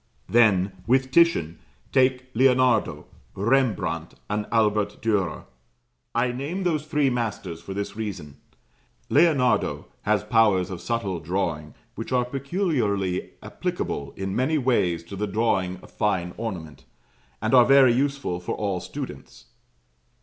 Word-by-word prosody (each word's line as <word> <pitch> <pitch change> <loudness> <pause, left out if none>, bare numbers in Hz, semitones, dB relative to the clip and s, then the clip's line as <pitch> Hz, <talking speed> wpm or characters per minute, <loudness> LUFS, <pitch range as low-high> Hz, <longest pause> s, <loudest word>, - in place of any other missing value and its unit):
Then, 105 -5 +4 0.2
with 130 +2 +2
Titian, 110 - +3 0.3
take 130 -1 +2
Leonardo, 125 -2 +3 0.3
Rembrandt, 120 +3 0 0.2
and 105 0 -1
Albert 105 -2 +1
Dürer. 100 -7 -1 0.7
I 120 +1 +2
name 145 +10 -4
those 155 -4 -1
three 150 -3 +2
masters 105 -8 -3
for 95 +3 -7
this 100 +1 -4
reason: 95 -10 -6 0.7
Leonardo 145 -6 +2 0.2
has - - +1
powers 100 -5 +3
of 90 - -6
subtle 110 -7 -2
drawing 80 -3 -3 0.2
which 115 - -7
are 125 -1 +2
peculiarly 125 - -1
applicable 70 -1 -4
in 95 0 -3
many 140 +5 +1
ways 95 - +1
to 90 +4 -9
the 105 +2 -2
drawing 95 -3 0
of - - -15
fine 90 -4 -1
ornament, 80 - -6 0.6
and - - -1
are 125 -2 +8
very 135 -2 +6
useful 135 -8 -1
for 90 - -4
all 100 -3 -2
students. - - -8
110 Hz, 130 wpm, -25 LUFS, 95-130 Hz, 0.7 s, are